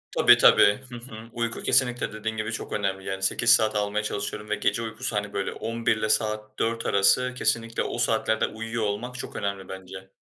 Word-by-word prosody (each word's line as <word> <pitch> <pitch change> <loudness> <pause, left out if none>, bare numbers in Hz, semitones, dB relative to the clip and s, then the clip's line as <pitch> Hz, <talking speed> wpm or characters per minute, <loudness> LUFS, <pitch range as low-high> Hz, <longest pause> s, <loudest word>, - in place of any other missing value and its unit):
Tabii, - - +7
tabii. 105 - +6
Hı 120 - -8
hı. 115 -2 -10
Uyku 115 -1 -3
kesinlikle 125 -3 +1
dediğin 110 +1 -4
gibi 110 +1 -3
çok 110 - -5
önemli, 95 -2 -2
yani, 95 0 -4
8 115 +4 +4
saat 110 -1 +3
almaya 105 0 -1
çalışıyorum 105 0 -4
ve 105 - +1
gece 115 - 0
uykusu, 115 +1 -4
hani, 105 0 -2
böyle, 100 -1 -2
23.00'le 110 -1 -1
saat 110 0 -1
4.00 115 0 -1
arası 100 +6 +3
kesinlikle 115 -2 0
o - - -4
saatlerde 110 0 +1
uyuyor 115 +1 -4
olmak 105 +5 -3
çok 130 - -7
önemli 100 -2 -4
bence. 95 0 -9
110 Hz, 190 wpm, -25 LUFS, 100-115 Hz, -, Tabii